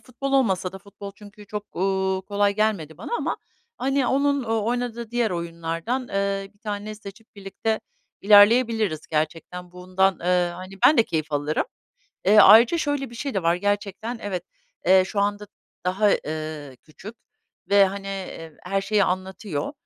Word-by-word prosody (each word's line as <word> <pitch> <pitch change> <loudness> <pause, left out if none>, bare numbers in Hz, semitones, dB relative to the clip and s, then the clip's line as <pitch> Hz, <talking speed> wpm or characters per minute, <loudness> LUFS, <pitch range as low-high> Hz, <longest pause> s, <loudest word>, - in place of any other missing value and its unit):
futbol 275 +2 -5
olmasa 190 -8 +1
da 190 - -8
futbol 200 0 -11
çünkü 210 0 -14
çok, 210 -1 -7
ııı, 190 0 0
kolay 200 0 +1
gelmedi 200 -8 -1
bana - - -8
ama, - - -2 0.4
hani, 270 0 +1
onun 280 0 +1
oynadığı 235 +1 -2
diğer 240 -3 0
oyunlardan, 170 +6 -3
ııı, 195 0 -1
1 - - -32
tanesini 210 0 -5
seçip 210 +3 -12
birlikte 200 +3 -3 0.4
ilerleyebiliriz 210 -4 +4
gerçekten. 170 +3 -3
Bundan, 185 +1 +1
ııı, 180 0 +1
hani, 185 +2 -10
ben 300 - +5
de - - +7
keyif 155 -5 -3
alırım. 145 +1 0 0.6
Eee, 210 +3 +5
ayrıca 230 - +8
şöyle 290 -5 -2
bir - - -12
şey 270 +1 -4
de 190 - 0
var. 170 +1 +3
Gerçekten 205 +4 -2
evet, 185 -4 -3 0.4
eee, 190 0 +6
şu 200 - -2
anda 205 +1 -1 0.4
daha, 195 +3 +2
eee, 155 -4 -4
küçük 190 +8 -12 0.6
ve, 200 -1 +7
hani, 195 +1 -4
eee, 185 -5 -7
her 195 +2 0
şeyi 200 0 +2
anlatıyor. 185 - -3
200 Hz, 155 wpm, -24 LUFS, 180-220 Hz, 0.6 s, ayrıca